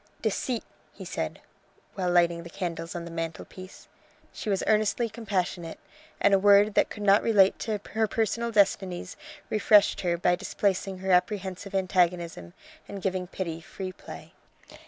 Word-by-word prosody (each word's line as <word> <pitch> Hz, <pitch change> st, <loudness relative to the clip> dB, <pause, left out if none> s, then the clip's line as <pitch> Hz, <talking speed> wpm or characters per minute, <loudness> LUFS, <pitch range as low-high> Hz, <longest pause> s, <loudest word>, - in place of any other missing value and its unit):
"Deceit!" 225 Hz, +2 st, -1 dB, 0.3 s
he -, -, -10 dB
said, -, -, -4 dB, 0.5 s
while 185 Hz, -2 st, -1 dB
lighting 170 Hz, -1 st, +3 dB
the 170 Hz, -, -10 dB
candles 170 Hz, -2 st, -5 dB
on 170 Hz, -1 st, -5 dB
the 170 Hz, -, -8 dB
mantelpiece. 165 Hz, +3 st, -7 dB, 0.5 s
She 215 Hz, -, -5 dB
was 195 Hz, -2 st, 0 dB
earnestly 215 Hz, +2 st, +2 dB
compassionate, 190 Hz, -6 st, -3 dB, 0.4 s
and 200 Hz, -, +4 dB
a 195 Hz, -, +5 dB
word 205 Hz, +1 st, +5 dB
that -, -, +3 dB
could 210 Hz, -, -7 dB
not 200 Hz, 0 st, +5 dB
relate 200 Hz, -4 st, +4 dB
to 215 Hz, -2 st, -2 dB
her 220 Hz, 0 st, +1 dB
personal 230 Hz, +2 st, -1 dB
destinies 195 Hz, -3 st, +1 dB, 0.4 s
refreshed 210 Hz, -1 st, +4 dB
her 175 Hz, -2 st, 0 dB
by 175 Hz, +1 st, +2 dB
displacing 190 Hz, +1 st, -1 dB
her 190 Hz, +1 st, -2 dB
apprehensive 190 Hz, +1 st, 0 dB
antagonism 175 Hz, -, 0 dB, 0.3 s
and 200 Hz, -, -7 dB
giving 185 Hz, -2 st, -1 dB
pity 170 Hz, -3 st, -5 dB
free 185 Hz, +2 st, -7 dB
play. 185 Hz, -, -12 dB
190 Hz, 150 wpm, -27 LUFS, 175-205 Hz, 0.5 s, a